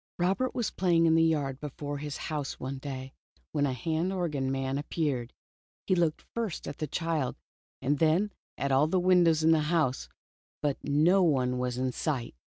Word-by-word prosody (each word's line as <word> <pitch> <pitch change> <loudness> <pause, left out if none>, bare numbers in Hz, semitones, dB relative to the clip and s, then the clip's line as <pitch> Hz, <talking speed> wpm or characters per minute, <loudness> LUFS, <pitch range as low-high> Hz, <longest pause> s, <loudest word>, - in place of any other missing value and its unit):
Robert 195 +9 0
was 240 -3 -1
playing 170 -3 +3
in 160 - +5
the 165 - +5
yard 145 -5 +1
before 145 0 -5
his 150 -1 -5
house 150 -4 -4
one 135 +1 -4
day, 135 -1 -6 0.4
when 145 -2 +1
a 130 - -1
hand 160 +8 -1
organ 150 -8 -1
man 135 +1 -1
appeared. 145 -5 -2 0.5
He - - +2
looked 170 -4 +1
first 225 -7 -3
at 145 - -6
the 155 - -2
child, 160 -4 -1 0.5
and 145 +2 +1
then 165 +6 +3 0.3
at 140 0 -1
ail 135 +3 +4
the 185 +3 +2
windows 175 -3 +4
in 160 - +5
the 160 - +5
house, 155 -7 +1 0.5
but 145 -2 -2
no 155 +7 +4
one 130 -7 +2
was 125 -1 -2
in 130 0 0
sight. 130 -3 -2
150 Hz, 180 wpm, -29 LUFS, 135-170 Hz, 0.5 s, in